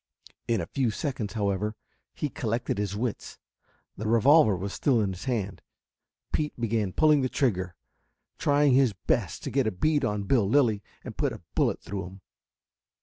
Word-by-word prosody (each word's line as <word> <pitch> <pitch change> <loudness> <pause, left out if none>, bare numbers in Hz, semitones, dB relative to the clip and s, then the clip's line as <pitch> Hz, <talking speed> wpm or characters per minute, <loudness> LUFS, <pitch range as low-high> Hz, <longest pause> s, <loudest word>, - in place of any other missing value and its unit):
In 115 -1 +1
a - - -3
few 130 -4 0
seconds, 120 -3 -3
however, 105 0 -1 0.4
he 150 - -2
collected 115 -6 -2
his 100 -1 -2
wits. 115 +1 -4 0.6
The 110 - -4
revolver 115 +1 +5
was 100 +2 -4
still 130 -5 +2
in 100 -3 0
his 90 - -9
hand. 110 -7 -2 0.7
Pete 150 -4 -1
began 110 -4 0
pulling 150 +5 +4
the 130 - 0
trigger, 95 -11 0 0.6
trying 145 -1 +3
his 130 -4 +4
best 95 - -1
to - - -4
get 135 -3 +1
a - - +1
bead 145 +10 +1
on 105 -4 -1
Bill 100 -1 +2
Lilly 115 -6 +3 0.2
and - - -8
put - - 0
a - - -11
bullet - - +1
through 95 -1 -5
him. 95 +1 -13
115 Hz, 170 wpm, -27 LUFS, 100-135 Hz, 0.7 s, revolver